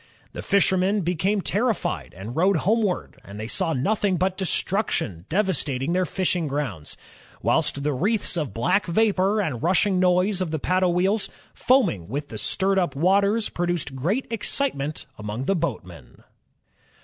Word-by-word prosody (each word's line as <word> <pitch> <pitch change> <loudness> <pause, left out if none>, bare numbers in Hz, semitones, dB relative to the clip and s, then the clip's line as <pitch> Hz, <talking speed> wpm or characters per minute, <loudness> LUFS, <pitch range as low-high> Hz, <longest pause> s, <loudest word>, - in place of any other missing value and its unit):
The - - -6
fishermen 195 0 +2
became 185 +4 0
terrified 220 +2 -1
and 105 +6 -7
rowed 190 +4 +3
homeward, 210 -2 0
and 100 +1 -10
they 110 - -4
saw 170 +6 0
nothing 195 +7 +1
but 185 +2 0
destruction 185 - -1
devastating 160 -6 0
their 185 0 +1
fishing 180 -4 -1
groimds; 125 - -4 0.5
whilst 140 - +1
the 150 0 0
wreaths 200 - 0
of 150 - -2
black 120 - +1
vapor 200 +2 +2
and 155 - -2
rushing 185 +3 +2
noise 180 +2 +2
of 180 - -1
the 160 - -2
paddle 180 +2 +1
wheels, 195 +4 +1 0.2
foaming 240 - +2
with 145 +6 -4
the 110 - -6
stirred 195 0 +1
up 170 -7 -1
waters, 200 +7 +2
produced 175 -5 -2
great 185 - -1
excitement 200 - -2
amongst 105 +4 -4
the 195 - +1
boatmen." 90 - -5
180 Hz, 150 wpm, -24 LUFS, 140-200 Hz, 0.5 s, rowed